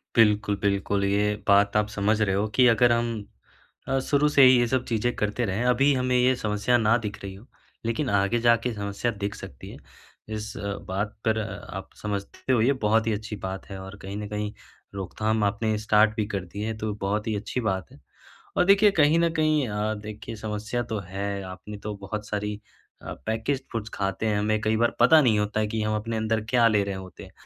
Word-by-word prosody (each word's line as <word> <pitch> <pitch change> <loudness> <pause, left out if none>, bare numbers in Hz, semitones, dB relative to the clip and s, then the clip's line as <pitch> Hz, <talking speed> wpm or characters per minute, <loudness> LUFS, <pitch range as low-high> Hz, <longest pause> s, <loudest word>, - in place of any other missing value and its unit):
बिल्कुल, 105 -2 +4
बिल्कुल। 100 0 0
ये 105 +1 +1
बात 100 0 +4
आप 105 0 +2
समझ 105 +1 0
रहे 95 -3 +2
हो 100 +2 +1
कि 125 -1 +6
अगर 120 +1 +5
हम 115 -3 -1 0.6
अ, 135 - +1
शुरू 145 +2 +2
से 140 -2 +6
ही 130 -1 +8
ये 120 - +3
सब 130 +1 0
चीज़ें 120 +1 0
करते 105 +3 -1
रहें 100 +3 -1
अभी 135 +3 +4
हमें 125 0 +1
ये 125 +1 +4
समस्या 110 +1 +1
ना 115 0 +3
दिख 105 -1 -4
रही 100 -1 -6
हो, 100 +5 -14 0.4
लेकिन 115 +5 -1
आगे 100 +3 +2
जाके 115 +1 +2
समस्या 100 +3 -2
दिख 100 0 -2
सकती 65 - -10
है। - - -10 0.6
इस 105 0 -5 0.4
बात 100 +3 -3
पर 110 0 +2
आप 95 -3 -6
समझते 100 +4 -4
हो 120 - +3
ये 130 +5 +4
बहुत 110 +1 +3
ही 110 - +2
अच्छी 105 +1 -5
बात 95 +1 -5
है, 95 -1 -7
और 95 +1 -9
कहीं 100 +1 -6
न 105 0 -5
कहीं 105 0 -3 0.4
रोकथाम 105 +3 -1
आपने 110 +1 0
स्टार्ट 105 0 +3
भी 110 - 0
कर 95 - -3
दी 100 - -5
है 110 0 -3
तो 110 -1 -3
बहुत 105 +3 -1
ही 110 - 0
अच्छी 115 +4 -3
बात 95 -2 -3
है। - - -16 0.6
और 180 - +4
देखिए 200 +2 +6
कहीं 150 +3 +4
न 170 0 +3
कहीं 155 -4 +2
अ, 105 +1 -1
देखिए 105 +2 -8
समस्या 110 +2 -3
तो 105 - -1
है 100 +2 -4
आपने 95 +3 -8
तो 105 +1 -6
बहुत 105 +1 -5
सारी 105 0 -3 0.4
अ, - - -6
पैकेज 115 +5 -1
फूड्स 110 -2 -4
खाते 95 +2 -2
हैं 105 -1 +1
हमें 110 +1 +1
कई 110 0 +1
बार 120 +1 +1
पता 155 +6 +7
नहीं 115 -6 +3
होता 105 +1 -1
है 105 - +1
कि 110 +1 -2
हम 110 0 0
अपने 110 +1 -3
अंदर 110 0 0
क्या 120 -2 +5
ले 105 -2 +3
रहे 100 -1 -3
होते 95 -1 -9
हैं। - - -13
105 Hz, 215 wpm, -26 LUFS, 100-115 Hz, 0.6 s, ही